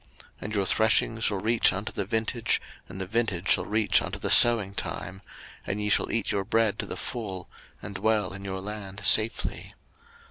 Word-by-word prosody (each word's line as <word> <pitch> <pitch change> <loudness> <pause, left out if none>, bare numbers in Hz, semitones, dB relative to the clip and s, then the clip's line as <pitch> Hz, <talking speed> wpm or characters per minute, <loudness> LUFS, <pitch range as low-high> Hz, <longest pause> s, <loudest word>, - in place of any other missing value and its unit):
03:026:005 - - -27
And 105 - -5
your 100 -2 0
threshing 110 +2 +1
shall 105 -2 0
reach 110 +4 +2
unto 100 +5 -5
the 100 - -4
vintage, 115 +3 -1 0.3
and 95 - -9
the 95 - -4
vintage 105 -3 -1
shall - - +4
reach 110 0 +2
unto - - -5
the - - -2
sowing 115 -5 +6
time: 95 0 -5 0.5
and 100 - -3
ye 105 0 -2
shall 105 - +1
eat 115 -3 -1
your 100 -1 -1
bread 110 0 0
to - - -4
the - - -6
full, 95 -7 -6 0.4
and 100 - -7
dwell 105 -1 -1
in 95 0 -8
your 95 -1 -5
land 100 -1 -7
safely. 110 +3 +2
105 Hz, 190 wpm, -26 LUFS, 95-110 Hz, 0.5 s, sowing